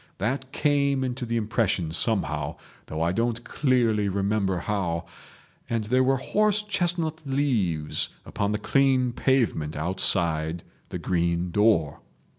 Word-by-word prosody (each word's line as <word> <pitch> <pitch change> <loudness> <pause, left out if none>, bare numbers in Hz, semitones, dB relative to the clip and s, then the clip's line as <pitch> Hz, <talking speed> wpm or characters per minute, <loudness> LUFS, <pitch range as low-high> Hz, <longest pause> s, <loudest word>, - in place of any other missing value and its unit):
That 130 +6 -2
came 140 -2 +1
into 125 -1 -3
the 115 0 -1
impression 105 -7 0
somehow, 80 -6 0 0.3
though 80 +1 -2
I 85 - +1
don't 115 +4 -1
clearly 115 -8 +1
remember 100 -1 0
how, 90 -3 -2 0.6
and 115 -2 0
there 125 +5 +2
were 135 +1 +3
horse 210 +9 +1
chestnut 175 -5 -1
leaves 115 - 0 0.2
upon 100 0 -2
the 105 - 0
clean 130 +1 +2
pavement 115 - 0
outside 85 -1 0 0.3
the - - -4
green 85 0 0
door. 100 -8 +2
110 Hz, 125 wpm, -26 LUFS, 85-130 Hz, 0.6 s, were